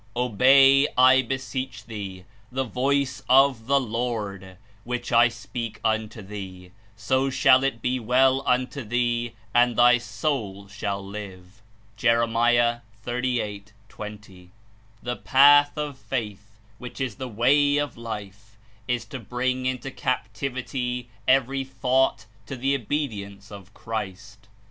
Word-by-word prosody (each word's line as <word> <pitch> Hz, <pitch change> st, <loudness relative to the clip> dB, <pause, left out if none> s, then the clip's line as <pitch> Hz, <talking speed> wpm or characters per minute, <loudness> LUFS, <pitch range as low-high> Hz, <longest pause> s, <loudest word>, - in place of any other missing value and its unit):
"Obey, 135 Hz, +4 st, +5 dB
I 130 Hz, +1 st, +6 dB
beseech 130 Hz, -2 st, -5 dB
thee, 100 Hz, -5 st, -7 dB, 0.3 s
the 135 Hz, +1 st, -1 dB
voice 135 Hz, +2 st, -1 dB
of 130 Hz, -3 st, +4 dB
the 140 Hz, +1 st, +4 dB
Lord, 110 Hz, -6 st, -4 dB, 0.3 s
which 125 Hz, 0 st, -4 dB
I 115 Hz, 0 st, +6 dB
speak 115 Hz, -1 st, -6 dB
unto 110 Hz, 0 st, -1 dB
thee; 95 Hz, -2 st, -9 dB, 0.2 s
so 130 Hz, +5 st, 0 dB
shall 130 Hz, 0 st, +4 dB
it 135 Hz, -5 st, -2 dB
be 125 Hz, +1 st, 0 dB
well 130 Hz, +3 st, +3 dB
unto 130 Hz, +2 st, 0 dB
thee, 120 Hz, +1 st, -1 dB, 0.2 s
and 120 Hz, 0 st, +4 dB
thy 120 Hz, +1 st, +5 dB
soul 115 Hz, -4 st, -3 dB
shall 100 Hz, -1 st, -4 dB
live/' 100 Hz, 0 st, -10 dB, 0.4 s
(Jer. 115 Hz, +2 st, +3 dB, 0.8 s
38. 120 Hz, -5 st, -3 dB, 0.2 s
20.) 105 Hz, -5 st, -11 dB, 0.5 s
The 120 Hz, 0 st, -3 dB
path 145 Hz, +2 st, +5 dB
of 145 Hz, -3 st, -4 dB
Faith, 110 Hz, -4 st, -5 dB, 0.2 s
which 125 Hz, +2 st, -9 dB
Is 130 Hz, -6 st, -3 dB
the 130 Hz, -1 st, -5 dB
way 145 Hz, +6 st, +3 dB
of 145 Hz, 0 st, -2 dB
Life, 110 Hz, -1 st, -8 dB, 0.3 s
Is 125 Hz, -1 st, -1 dB
to 130 Hz, +4 st, -8 dB
bring 125 Hz, +3 st, -2 dB
Into 130 Hz, +1 st, -3 dB
captivity 125 Hz, 0 st, -3 dB, 0.2 s
every 135 Hz, +1 st, +2 dB
thought 130 Hz, -3 st, 0 dB, 0.2 s
to 135 Hz, -, -5 dB
the 135 Hz, +2 st, 0 dB
obedience 105 Hz, -7 st, -4 dB
of 100 Hz, -2 st, -11 dB
Christ. 105 Hz, 0 st, -7 dB
120 Hz, 125 wpm, -24 LUFS, 105-130 Hz, 0.8 s, I